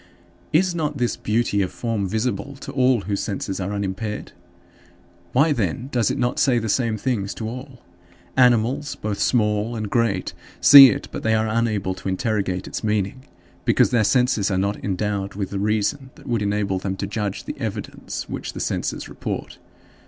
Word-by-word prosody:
10. 155 - +5
Is 185 -2 -1
not 150 -3 -2
this 120 -2 0
beauty 105 -2 0
of 95 - -1
form 115 -5 -2
visible 110 +4 -2
to 135 - -8
all 130 -3 +3
whose 100 +1 -2
senses 100 -1 -3
are 95 +1 -3
unimpaired? 100 +1 -4 1.0
Why, 145 +5 +4
then, 115 - -2
does 120 -6 +2
it - - -1
not 120 0 0
say 130 -3 +3
the 110 -1 -1
same 115 -1 +1
things 105 -4 -2
to 110 - -4
all? 125 - -8 0.5
Animals, 125 +3 +3
both 105 -1 -4
small 105 -1 +1
and 110 -2 -4
great, 115 -6 0 0.3
see 140 -2 +11
it 105 - -3
but - - -5
they 110 0 +2
are 110 0 +1
unable 110 -4 0
to 95 +1 -5
interrogate 95 -2 -1
its - - -5
meaning, 105 +4 -1 0.4
because - - +3
their 120 -3 +3
senses 125 -3 +2
are 95 - 0
not 100 +2 -1
endowed 100 0 -2
with 100 -2 -3
the 100 - -2
reason 105 +6 0
that 150 - -16
would 120 -5 -1
enable 100 -2 0
them 95 0 -3
to 100 - -3
judge 105 -1 -3
the - - -6
evidence - - -5
which - - -5
the - - -6
senses - - -2
report. - - -6
110 Hz, 180 wpm, -22 LUFS, 100-125 Hz, 1.0 s, see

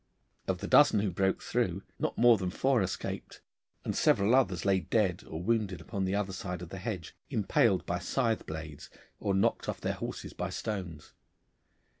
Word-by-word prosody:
Of - - 0
the - - -3
dozen 105 - +6
who 100 -2 0
broke 95 +2 0
through, - - -1 0.2
not - - -1
more 120 -2 +6
than 90 -2 -1
four 130 +5 +2
escaped, 90 -3 -4 0.5
and - - -2
several 100 +4 +3
others 95 -10 +2
lay 95 -1 +4
dead 90 0 0
or 80 +2 -5
wounded 105 -4 0
upon 95 +3 -3
the 95 +1 0
other 100 -2 -1
side 90 0 -5
of 85 - -8
the 95 - -7
hedge, 95 -5 -5
impaled 105 -1 +2
by 90 +1 -1
scythe 115 +4 0
blades 80 -2 -7 0.3
or 100 - 0
knocked 110 +4 +1
off - - -3
their - - -1
horses - - -6
by 90 +1 -3
stones. 90 -7 -5
95 Hz, 180 wpm, -30 LUFS, 90-110 Hz, 0.5 s, dozen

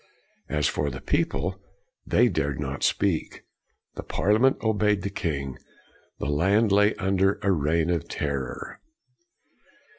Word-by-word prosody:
As 75 -1 +1
for 70 - -1
the 65 -1 -6
people, 95 +2 -1 0.5
they - - +4
dared 70 -1 -1
not 70 -1 -4
speak. 95 -6 0 0.5
The - - -6
Parliament 110 +6 +2
obeyed 105 -3 +1
the 100 - -3
king. 70 -10 -3 0.6
The - - -4
land 95 +9 +2
lay 105 +2 +4
under 95 0 +1
a 100 - +3
reign 80 +1 +1
of 85 -2 -1
terror. 70 -4 -4
90 Hz, 125 wpm, -26 LUFS, 75-100 Hz, 0.6 s, they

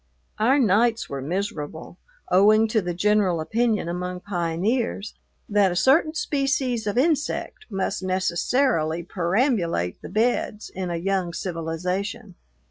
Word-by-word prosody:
Our 250 +6 +4
nights 230 -1 +2
were 140 -1 -3
miserable, 165 0 -4 0.3
owing 215 +4 +5
to 220 0 +2
the 175 -2 -3
general 200 -2 +2
opinion 215 +4 0
among 180 +1 -4
pioneers 200 +5 -1 0.3
that 205 -2 +3
a - - -3
certain 285 - +3
species 275 -6 0
of 205 - -1
insect 305 +8 0
must 195 -2 -2
necessarily 185 - 0
perambulate 175 - 0
the - - -8
beds 220 -1 -1
in 185 -1 -4
a 170 - -2
young 180 0 -1
civilization. 180 +6 -3
195 Hz, 125 wpm, -24 LUFS, 175-230 Hz, 0.3 s, owing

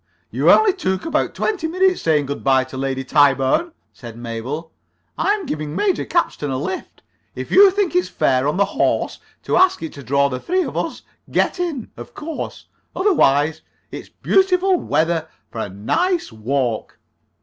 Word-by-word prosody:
"You - - +2
only 430 -3 +6
took 190 - -2
about 315 -1 -1
twenty 380 -7 -1
minutes 370 +2 +1
saying 150 -3 +2
good 140 +1 -5
by 135 -1 +4
to 130 0 -11
Lady 135 0 -2
Tyburn," 140 - +3 0.2
said 115 -3 -11
Mabel. 120 +8 -5 0.4
"I'm 405 -2 0
giving 150 - -4
Major 390 -3 0
Capstan 330 - -1
a 130 - -1
lift. 185 +8 -6 0.3
If - - -6
you 395 0 +8
think 385 -2 -1
it's 360 - +2
fair 130 +1 +1
on 150 - 0
the 200 - +4
horse 200 - -1 0.2
to - - 0
ask 370 - +3
it 160 - -5
to 140 - -10
draw 140 +2 +2
the 130 -2 -4
three 370 +1 0
of - - -6
us, - - -3 0.3
get - - 0
in, 320 -10 -3
of - - -10
course. 310 +1 -6 0.3
Otherwise, 160 - +2 0.3
it's - - -8
beautiful 380 0 +2
weather 165 - 0 0.2
for 115 - -6
a - - -4
nice 330 - -1
walk." 115 +1 -2
160 Hz, 170 wpm, -20 LUFS, -, 0.4 s, you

